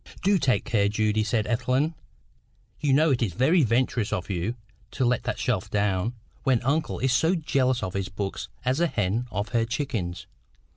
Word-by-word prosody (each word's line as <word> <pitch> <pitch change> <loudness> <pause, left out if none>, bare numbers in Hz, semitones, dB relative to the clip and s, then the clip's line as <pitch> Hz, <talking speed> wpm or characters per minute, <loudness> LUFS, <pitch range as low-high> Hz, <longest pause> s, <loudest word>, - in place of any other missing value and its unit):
"Do 195 0 +4
take 125 -8 +1
care, 105 -4 +2
Judy," 110 0 +1
said 110 0 0
Ethelwyn. 130 +6 +1 0.9
"You 145 -2 +1
know 150 +3 +4
it 125 - +1
is 105 -7 0
very 155 - +3
venturous 120 -3 +1
of 90 +2 -2
you 95 +6 -2 0.3
to 130 - -1
let 120 0 +2
that - - -2
shelf 120 -8 -1
down, 100 +2 0 0.3
when 130 -4 +2
uncle 150 +5 0
is 130 +2 +2
as 170 +4 +3
jealous 130 -7 +1
of 95 -1 -3
his 95 -1 -2
books 95 0 -4 0.2
as 130 +4 +1
a 170 - +3
hen 110 - -1
of 100 +1 -3
her 115 -2 +1
chickens. 115 -8 -3
120 Hz, 185 wpm, -26 LUFS, 105-135 Hz, 0.9 s, Do